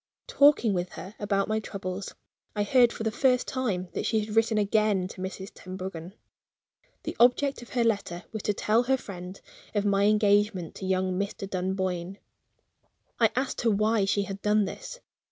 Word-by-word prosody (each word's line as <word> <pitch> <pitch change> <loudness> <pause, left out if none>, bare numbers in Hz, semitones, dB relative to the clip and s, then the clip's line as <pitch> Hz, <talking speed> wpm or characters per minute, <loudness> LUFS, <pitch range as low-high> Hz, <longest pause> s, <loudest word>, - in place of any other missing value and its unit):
Talking 280 -7 +4
with 180 -1 -1
her 190 - -8
about 200 -1 0
my 215 +1 0
troubles, 195 -2 -6 0.4
I 205 - +1
heard 240 +2 +5
for - - -6
the 220 - 0
first 250 +2 +2
time 210 -9 -2
that - - -2
she 220 - +2
had 210 0 -4
written 225 -1 +3
again 210 -2 +2
to 185 - -9
Mrs. 190 +1 -6
Tenbruggen. 185 -1 -7 0.9
The - - -4
object 250 +3 +3
of 240 - -12
her 245 -2 +2
letter 200 -6 -1
was 220 - -4
to 210 - 0
tell 220 +4 +2
her 265 +2 +2
friend 185 -4 -8 0.4
of 205 0 +1
my 200 0 +3
engagement 205 -4 +2
to 190 - -5
young 185 0 0
Mr. 200 0 -3
Dunboyne. 185 -1 -2 1.0
I 225 -2 +5
asked 260 +2 -1
her 235 - +2
why 215 0 +2
she 200 +1 +1
had 195 0 -6
done 210 0 +3
this. - - -8
205 Hz, 175 wpm, -27 LUFS, 190-225 Hz, 1.0 s, heard